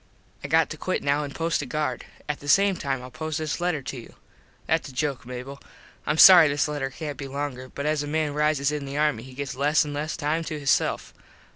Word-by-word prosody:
I - - -4
got - - +3
to - - -6
quit - - -2
now 145 +1 +1
an 145 - -5
post 165 +2 -1
a 145 - -6
guard. 150 +2 -2 0.2
At 150 -1 -3
the 145 - -11
same 195 +5 +4
time 135 -6 -3
Ill 125 - -10
post 155 +1 -4
this 155 +1 -3
letter 175 -6 -1
to 130 - -6
you. 115 - -13 0.5
Thats 160 -2 0
a - - -10
joke 135 -2 -2
Mable. 125 +2 -7 0.5
Im 150 - +1
sorry 175 -3 +10
this 145 +1 +1
letter 145 -3 -3
cant 145 +1 -6
be 140 - -5
longer 135 -2 -5
but 140 - -6
as 155 -1 +1
a 145 - -4
man 155 -1 -1
rises 150 -1 +1
in 150 -2 -4
the 140 +1 -5
army 150 -6 +1
he 130 +1 -12
gets 140 -1 -4
less 145 +4 +2
an 145 - -5
less 150 +2 -3
time 160 +1 -1
to 155 -1 -4
hisself. 140 -2 0
145 Hz, 240 wpm, -25 LUFS, 140-155 Hz, 0.5 s, sorry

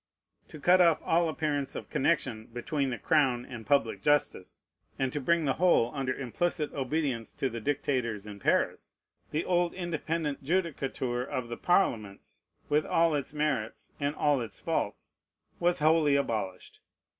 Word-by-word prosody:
To 155 - -11
cut 180 +5 +5
off 170 -3 +5
all 165 0 +3
appearance 150 -3 -2
of - - -7
connection 125 -8 0
between 135 +4 -2
the 120 - -3
crown 130 -6 +2
and 120 -4 -9
public 115 -8 +2
justice, 145 -8 0 0.4
and 130 -1 -1
to 145 - -2
bring 170 +3 +2
the 135 - +2
whole 170 -10 +4
under 135 -3 -1
implicit 150 +5 -2
obedience 135 -4 -2
to 135 - -2
the 115 - -4
dictators 125 -5 -1
in 105 -1 -9
Paris, - - 0 0.3
the 155 +3 -2
old 175 -1 +1
independent 165 -4 -3
judicature 135 -7 -1
of 125 -2 -4
the 120 - -5
Parliaments, 110 - 0 0.3
with 150 +1 +2
all 165 +1 +2
its 145 0 -3
merits 140 -8 -2
and 145 +1 -1
all 145 -4 +2
its 110 -5 -7
faults, - - -3 0.4
was 175 0 +2
wholly 155 -1 +4
abolished. 110 -9 -2
140 Hz, 155 wpm, -29 LUFS, 120-160 Hz, 0.4 s, cut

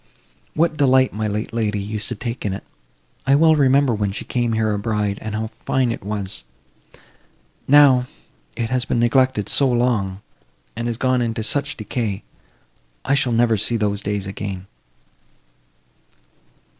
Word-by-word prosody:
What 155 0 +1
delight 130 -2 +4
my 110 0 -2
late 105 +2 -3
lady 105 -3 -1
used 105 +1 -4
to 120 - -4
take 115 +3 -5
in 100 - -1
it! 95 - -6 0.6
I 135 - +5
well 160 +2 +5
remember 140 -2 +3
when 105 -2 -1
she 100 - -6
came 120 -2 -1
here 110 -1 +1
a 105 - -2
bride, 105 -1 -1
and 110 -1 -4
how 110 +1 -2
fine 120 +3 -1
it 115 - -5
was. 100 -1 -3 1.2
Now, 135 -3 +6 0.5
it 115 0 -3
has 130 -1 +1
been 125 - -1
neglected 120 -2 +2
so 140 - +4
long, 115 -6 0 0.5
and 120 0 -3
is 115 - -3
gone 130 0 +1
into 115 -1 -2
such 140 +6 0
decay! 110 -2 -3 0.8
I 135 - +2
shall 135 -3 +2
never 115 -1 +3
see 115 +3 0
those 105 -1 -1
days 100 -1 -2
again!" 95 -1 -5
115 Hz, 155 wpm, -21 LUFS, 105-130 Hz, 1.2 s, Now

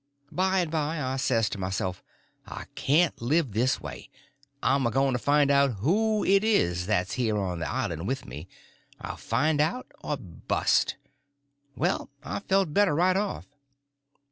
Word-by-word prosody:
By 190 +3 +2
and 165 -3 -3
by 155 0 -1
I 130 -1 -2
says 115 -4 +2
to 100 - -5
myself, 95 -1 -3 0.5
I - - -7
can't 155 +2 +2
live 140 +2 +1
this 120 +6 +1
way; 70 -3 -9 0.5
I'm 135 -3 +3
a - - +1
going 135 +2 +1
to 125 - 0
find 145 +2 +3
out 140 -2 +4
who 210 - +1
it 195 +1 +4
is 90 - +1
that's 95 -3 0
here 115 -4 0
on 90 -4 -2
the 80 -2 -3
island 80 +4 -2
with 135 +2 -2
me; 75 +8 -8 0.5
I'll - - -6
find 150 +6 +1
it - - +6
out 180 +12 -3
or 150 - -2
bust. 90 - 0 0.8
Well, 175 +6 -1
I - - -4
felt 195 -5 +1
better 200 -5 +3
right 180 +3 +3
off. 200 +1 -2
135 Hz, 170 wpm, -27 LUFS, 105-170 Hz, 0.8 s, it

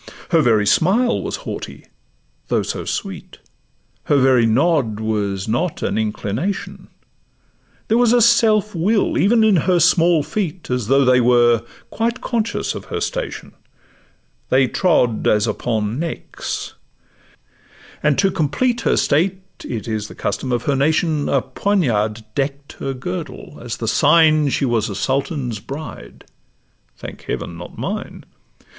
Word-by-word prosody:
Her 165 -2 +4
very 110 -6 +3
smile 215 - +2
was - - -3
haughty, - - -7 0.6
though - - +1
so - - -4
sweet; - - -5 0.7
Her 150 - +2
very 130 -3 +4
nod 125 -3 +1
was 105 -3 -2
not 140 +10 -1
an - - -1
inclination; 110 - -3 1.0
There 225 +2 +2
was 240 -2 +4
a 245 - +5
self 220 -2 +4
will 200 +5 +1
even 225 +3 +4
in 215 -4 +4
her 180 +2 +2
small 170 -2 +4
feet, 180 - -4
As 125 -4 -1
though 135 +2 +4
they 125 0 +4
were 120 -1 +4 0.3
quite 235 +2 -1
conscious 230 -2 -2
of - - -8
her - - -4
station— - - -4 1.0
They 130 0 +4
trod 125 - +1
as 105 -1 +3
upon 110 +1 -2
necks; 165 0 -5 1.3
and 150 -2 +2
to 195 -1 +3
complete 190 - 0
Her - - +1
state 185 +6 +1 0.2
(it 115 -3 -5
is 110 -2 -3
the - - -12
custom 105 +6 -3
of 120 - 0
her 145 -3 +1
nation), 155 +2 +1
A 135 -2 +1
poniard 115 - 0
deck'd 140 0 -3
her 135 -1 -3
girdle, 95 -7 -7
as - - -5
the - - -4
sign 155 -1 +4
She 135 - 0
was 120 -4 0
a 100 - -5
sultan's 130 - -2
bride 145 +8 -9 0.7
(thank - - -9
Heaven, - - -4
not - - -10
mine!). - - -5
140 Hz, 140 wpm, -19 LUFS, 115-185 Hz, 1.3 s, a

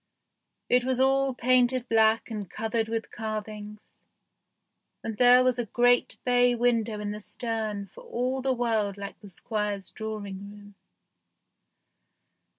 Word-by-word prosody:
It 250 0 +4
was 260 0 0
all 270 0 +3
painted 250 0 +2
black 225 0 +3
and 205 -4 -5
covered 225 +1 -2
with 225 0 -4
carvings, 215 -1 -6 1.2
and 225 -2 -4
there 250 0 +7
was 255 -1 +1
a 240 - -1
great 245 +3 +2
bay 245 0 +4
window 230 -3 +1
in 205 0 -3
the 210 +1 -6
stern 220 -2 -2
for 195 - -15
all 255 +2 -2
the 265 0 +1
world 225 -5 0
like 200 0 -8
the 205 - -12
Squire's 205 +1 -3
drawing 205 -2 -6
room. 205 -1 -14
225 Hz, 135 wpm, -27 LUFS, 210-245 Hz, 1.2 s, there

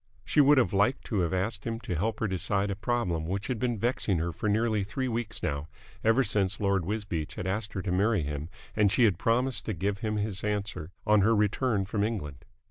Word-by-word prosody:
She 150 - +4
would 145 +1 +6
have 125 -4 +3
liked 100 +7 +2
to 100 -6 0
ask 95 +2 -1
him 115 -1 -3
to 95 - -4
help 110 +7 -1
her 110 - +2
decide 100 +1 0
a - - -2
problem 100 -7 -1
which 100 +3 -2
had 120 0 -2
been 120 -1 0
vexing 115 -4 0
her 85 +2 -1
for 105 +6 -2
nearly 110 -1 +1
three 130 +7 -3
weeks 115 -2 -3
now, 70 -2 -2 0.4
ever 115 +4 +4
since 100 -2 +1
Lord 100 -4 +1
Wisbeach 100 -6 -3
had - - -5
asked 105 +3 -2
her 95 - -3
to 90 - -2
marry 100 0 +2
him 75 +2 -4 0.3
and 105 -2 +4
she 125 - +4
had 105 -5 +3
promised 115 -1 +1
to 110 - -2
give 100 +3 -2
him 110 0 -1
his 105 -2 -2
answer 105 -6 -2 0.2
on 105 -1 +5
her 110 +3 +4
return 105 0 +1
from 100 +1 -1
England. 90 -11 -4
105 Hz, 220 wpm, -29 LUFS, 95-115 Hz, 0.4 s, would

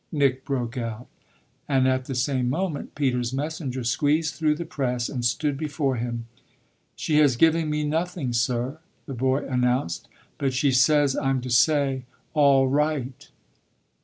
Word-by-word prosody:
Nick 135 -4 +1
broke 125 -2 -2
out; 115 +1 -5 0.6
and 130 -2 +3
at 130 0 +1
the 135 - -4
same 130 -1 0
moment 160 0 -3
Peter's 125 -4 0
messenger 140 -3 -3
squeezed 150 +6 +1
through 155 -2 +1
the 170 +2 -5
press 125 -6 -2
and 125 -3 -4
stood 135 +5 0
before 140 -2 -1
him. 120 0 -4 0.7
"She 150 -1 +1
has 145 -5 +4
given 160 +3 +3
me 150 0 -1
nothing, 160 -3 -2
sir," 120 +4 -1 0.3
the 140 - -6
boy 130 +2 0
announced; 125 -8 0 0.3
"but 135 -2 0
she 135 +2 +2
says 140 +2 +4
I'm 135 -1 0
to 125 0 -5
say 135 0 +2 0.3
'All 140 -3 +5
right!'" 140 -2 -1
135 Hz, 150 wpm, -25 LUFS, 125-150 Hz, 0.7 s, All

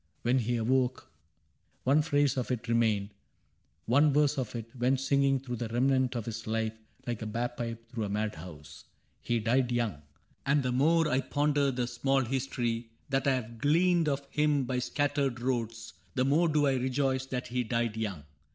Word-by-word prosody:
When 125 +2 +3
he 120 +1 0
awoke 125 +2 0 0.7
One 140 +4 +4
phrase 145 -3 +2
of 130 -2 -2
it 125 -1 -3
remained; 110 -3 +1 0.7
one 145 +6 +4
verse 145 0 +2
of 125 -2 -4
it 115 +2 -7
Went 130 +2 +1
singing 135 0 +2
through 125 -2 -5
the 115 - -3
remnant 130 +2 +1
of 115 -3 -3
his 115 -1 -6
life 110 0 -1 0.3
Like 120 -3 -3
a 110 - -3
bag 120 +3 -2
pipe 115 -1 -5
through 115 -2 -3
a - - -4
mad 105 +1 -1
house. 80 -3 -11 0.2
— - - -42
He 120 - 0
died 125 +3 +1
young. 115 -11 -1 0.4
And 140 0 +2
the 125 - 0
more 160 +6 +3
I 130 -2 +1
ponder 145 +1 +1
the 125 -2 -1
small 135 +2 +1
history 120 -2 -2 0.2
That 135 0 0
I 135 - +4
have 115 -2 -6
gleaned 165 +3 +3
of 140 0 -2
him 150 -2 +2
by 125 0 -1
scattered 140 -1 0
roads. 115 -2 -3 0.2
The 130 -1 +2
more 155 +5 +3
do 150 -1 +2
I 135 -2 +2
rejoice 130 +1 0
that 125 -1 -3
he 125 0 0
died 115 -1 -1
young. 100 -9 -3
125 Hz, 190 wpm, -30 LUFS, 115-140 Hz, 0.7 s, One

